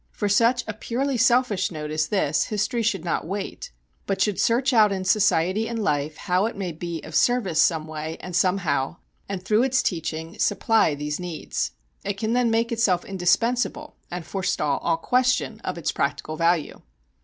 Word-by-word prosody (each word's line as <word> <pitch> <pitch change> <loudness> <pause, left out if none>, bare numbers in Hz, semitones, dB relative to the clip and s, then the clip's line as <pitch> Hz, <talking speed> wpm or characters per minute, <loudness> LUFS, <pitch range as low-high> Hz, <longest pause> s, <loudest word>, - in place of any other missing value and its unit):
For 205 - -3
such 235 +4 +3
a 215 - -3
purely 255 +6 -2
selfish 240 -5 +3
note 150 -2 -6
as 155 0 0
this 155 -8 +1
history 210 +3 -1
should 205 -6 -1
not 170 - -1
wait; 195 +2 -5 0.4
but 195 - -1
should 200 0 +1
search 255 +3 +2
out 215 -3 +5
in 190 -1 -2
society 200 0 +2
and 235 - -4
life 150 -7 -1
how 185 +4 +1
it 230 - -6
may 190 -3 -3
be 165 0 -5
of 160 - -10
service 205 -6 +2
some 160 -3 +2
way 155 0 -5
and 180 -1 -6
somehow, 170 -6 +1 0.3
and 190 -2 -5
through 215 +3 +3
its 260 0 +2
teaching 165 -1 -3
supply 205 -6 +2
these 150 +2 -3
needs. 175 -3 -3 0.3
It 200 0 -3
can 220 +2 -1
then 245 -1 +2
make 230 +1 +1
itself 215 -6 +1
indispensable 230 +10 0
and 175 -2 -5
forestall 150 -7 -1
all 165 -1 0
question 250 +2 +1
of 185 -5 -5
its 170 - -1
practical 140 +2 -2
value. 165 -1 0
195 Hz, 180 wpm, -24 LUFS, 165-225 Hz, 0.4 s, out